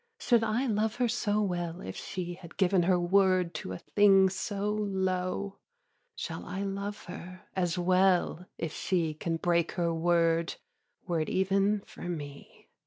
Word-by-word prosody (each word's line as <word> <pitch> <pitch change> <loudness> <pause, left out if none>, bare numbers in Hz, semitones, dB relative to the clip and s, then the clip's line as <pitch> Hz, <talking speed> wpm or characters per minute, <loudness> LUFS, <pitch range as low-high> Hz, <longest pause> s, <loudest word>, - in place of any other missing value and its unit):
Should 240 - +3
I 230 +4 +1
love 220 -2 0
her 245 0 +1
so 215 -2 +1
well 175 -3 -2
if - - -6
she 180 -2 -5
Had 175 -1 -13
given 190 -1 +3
her 180 -1 +4
word 185 -1 +3
to - - -6
a 95 - -4
thing 195 - +5
so 200 +1 -2
low? 190 -1 -1 0.6
Shall - - -5
I 195 +1 -4
love 200 +1 -4
her 185 +1 -9
as 175 -2 0
well 180 -1 +2
if 165 -2 -3
she 170 -4 0
Can 165 +2 -2
break 170 0 +1
her 170 -2 0
word 165 0 +2 0.5
were 175 -4 0
it 155 - -2
even 195 +2 +2
for 175 - -8
me? 145 -4 -8
185 Hz, 160 wpm, -30 LUFS, 175-200 Hz, 0.6 s, thing